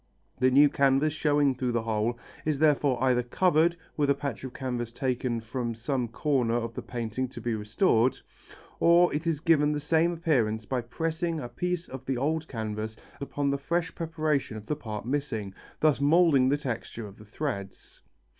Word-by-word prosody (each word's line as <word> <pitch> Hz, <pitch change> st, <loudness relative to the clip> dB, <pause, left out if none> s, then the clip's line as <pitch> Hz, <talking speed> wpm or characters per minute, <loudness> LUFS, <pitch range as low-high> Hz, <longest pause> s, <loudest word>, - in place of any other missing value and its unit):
The 130 Hz, -, +4 dB
new 140 Hz, +3 st, +7 dB
canvas 140 Hz, +2 st, +2 dB
showing 145 Hz, -3 st, +2 dB
through 125 Hz, -1 st, -2 dB
the 120 Hz, -1 st, 0 dB
hole 110 Hz, +1 st, -1 dB, 0.3 s
is 155 Hz, -2 st, 0 dB
therefore 145 Hz, -4 st, +2 dB
either 125 Hz, -2 st, +3 dB
covered 170 Hz, +6 st, +2 dB, 0.2 s
with 145 Hz, -2 st, +1 dB
a 140 Hz, -, +4 dB
patch 140 Hz, -1 st, -5 dB
of 130 Hz, -, -5 dB
canvas 125 Hz, -3 st, -4 dB
taken 125 Hz, -2 st, -1 dB
from 115 Hz, +1 st, -3 dB
some 125 Hz, +2 st, -2 dB
comer 125 Hz, -1 st, 0 dB
of 115 Hz, -1 st, -2 dB
the -, -, -5 dB
painting 120 Hz, +1 st, -3 dB
to 125 Hz, -, -9 dB
be 120 Hz, -2 st, -2 dB
restored, 115 Hz, -, +2 dB, 0.6 s
or 170 Hz, +1 st, +5 dB
it 155 Hz, +3 st, -2 dB
is 155 Hz, -3 st, 0 dB
given 150 Hz, -3 st, +3 dB
the 150 Hz, -, -1 dB
same 160 Hz, +3 st, +2 dB
appearance 120 Hz, -10 st, 0 dB
by 125 Hz, +2 st, -1 dB
pressing 160 Hz, +6 st, -2 dB
a 125 Hz, -, -5 dB
piece 180 Hz, +8 st, -3 dB
of 130 Hz, 0 st, -8 dB
the 130 Hz, -1 st, 0 dB
old 160 Hz, +4 st, -1 dB
canvas 110 Hz, -2 st, -4 dB, 0.2 s
upon 140 Hz, 0 st, -1 dB
the 140 Hz, -, -1 dB
fresh 165 Hz, +3 st, -1 dB
preparation 155 Hz, -7 st, -1 dB
of 105 Hz, -, -9 dB
the 150 Hz, -, -1 dB
part 110 Hz, -7 st, -6 dB
missing, 120 Hz, -7 st, -2 dB, 0.3 s
thus 150 Hz, -4 st, +3 dB
moulding 145 Hz, -3 st, +5 dB
the 145 Hz, -, +2 dB
texture 120 Hz, -5 st, -5 dB
of 100 Hz, -1 st, -12 dB
the 105 Hz, -, -13 dB
threads. 105 Hz, -4 st, -6 dB
135 Hz, 185 wpm, -28 LUFS, 120-155 Hz, 0.6 s, new